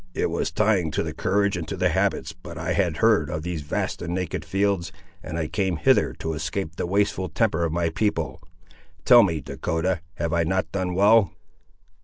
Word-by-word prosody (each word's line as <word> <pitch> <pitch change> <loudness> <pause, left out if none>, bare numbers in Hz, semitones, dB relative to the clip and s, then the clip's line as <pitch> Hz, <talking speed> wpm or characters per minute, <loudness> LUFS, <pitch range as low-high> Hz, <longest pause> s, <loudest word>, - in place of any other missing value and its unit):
It - - 0
was - - -1
trying 105 -6 +1
to - - 0
the - - -4
courage 100 +1 +1
and 85 -3 -4
to 100 - -4
the 90 0 +2
habits, 90 -3 0
but 90 -1 -11
I 85 +3 -2
had 90 -6 0
heard 105 -8 +3
of 80 -2 -4
these 85 -2 -3
vast 75 - -3
and 85 +1 -3
naked 90 -2 -3
fields, 100 -3 0 0.3
and 80 - -6
I 80 -2 -1
came 95 0 -1
hither - - +3
to 80 - -4
escape 80 +2 -4
the - - -3
wasteful 95 -1 0
temper 85 -1 +1
of 80 - -2
my 85 0 0
people. 105 +6 -1 0.6
Tell 120 -1 +8
me, 85 -8 0
Dahcotah, 85 +4 -2
have 85 -1 -2
I 85 0 +2
not 95 +3 -1
done 90 -2 -2
well?" 100 -2 +5
90 Hz, 200 wpm, -24 LUFS, 80-100 Hz, 0.6 s, Tell